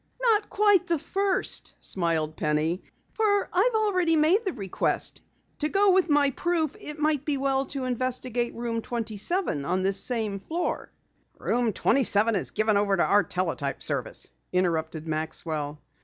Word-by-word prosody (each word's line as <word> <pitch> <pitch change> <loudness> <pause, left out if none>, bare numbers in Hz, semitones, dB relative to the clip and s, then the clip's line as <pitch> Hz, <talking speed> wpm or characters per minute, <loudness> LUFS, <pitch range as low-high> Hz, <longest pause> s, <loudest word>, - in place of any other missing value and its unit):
"Not 445 -4 +2
quite 410 -3 +3
the 335 - +2
first," 390 +5 -1
smiled 165 -4 -1
Penny, 155 +4 0 0.3
"for 410 -2 +2
I've 440 +6 +3
already 370 -6 +2
made 325 +8 +4
the 380 -5 -2
request. 195 -3 -2 0.4
To 300 - 0
go 400 +2 +3
on - - +6
with 370 -2 +3
my 290 -1 +4
proof, 320 0 -1
it 300 0 -4
might 300 -2 +1
be 295 -2 0
well 270 0 0
to 275 -2 -4
investigate 250 -1 -1
Room 230 -1 -2
27 225 - -2
on 185 +5 0
this 195 0 +2
same 220 -5 -1
floor." 335 - -3 0.5
"Room 240 -2 0
27 225 -1 +2
is 190 - 0
given 215 -1 +1
over 200 -1 +2
to - - +3
our 205 - +5
teletype 165 -6 -2
service," - - 0 0.2
interrupted 165 -3 -1
Maxwell. 155 -1 -3
245 Hz, 155 wpm, -26 LUFS, -, 0.5 s, on